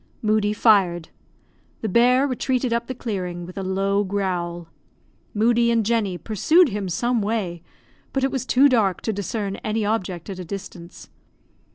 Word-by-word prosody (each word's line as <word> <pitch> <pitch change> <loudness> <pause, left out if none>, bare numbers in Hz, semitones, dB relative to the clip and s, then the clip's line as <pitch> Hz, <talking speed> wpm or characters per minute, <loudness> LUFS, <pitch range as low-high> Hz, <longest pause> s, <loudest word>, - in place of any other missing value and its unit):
Moodie 215 -1 +2
fired. 190 -7 +3 0.7
The 220 - -2
bear 250 +6 +4
retreated 255 -2 -1
up 235 0 -1
the 260 - -5
clearing, 180 -7 -4
with 180 - -11
a 195 - -4
low 195 +2 0
growl. 180 -4 -3 0.7
Moodie 235 +2 +3
and 230 -2 +2
Jenny 210 -5 0
pursued 305 - +3
him 200 -3 -3
some 235 +6 0
way, 200 -5 -2 0.5
but 270 - -1
it 270 - +1
was 265 -3 -2
too 265 +2 +4
dark 215 -8 +2
to 220 - -2
discern 200 0 -3
any 215 0 -2
object 185 -5 -2
at 195 -2 -6
a - - -5
distance. 180 -1 -9
210 Hz, 160 wpm, -23 LUFS, 185-235 Hz, 0.7 s, bear